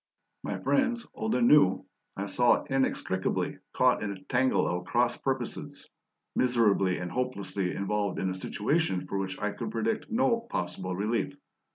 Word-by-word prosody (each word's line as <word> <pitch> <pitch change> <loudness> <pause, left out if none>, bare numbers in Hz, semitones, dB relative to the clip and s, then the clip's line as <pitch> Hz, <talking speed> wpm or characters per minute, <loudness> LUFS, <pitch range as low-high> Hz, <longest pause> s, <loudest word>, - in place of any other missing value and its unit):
My - - -3
friends 245 -3 +1
old 220 +1 -1
and 240 - +3
new 95 - +5 0.3
I 100 - -2
saw 120 +4 +3
inextricably 130 -8 -1
caught - - +3
in 105 - -2
a 95 -1 -9
tangle 130 +5 +2
of 90 +1 -2
cross 120 0 +2
purposes, 130 -3 -4 0.4
miserably 105 -7 +3
and 90 0 -5
hopelessly 100 -7 -2
involved 100 0 -1
in 95 0 -1
a - - -2
situation 105 - 0
for 100 - -3
which 95 -1 -3
I 105 0 -1
could 100 - -5
predict 220 +1 -2
no 235 0 +2
possible 90 +1 -3
relief. 115 +8 -1
105 Hz, 155 wpm, -29 LUFS, 95-135 Hz, 0.4 s, new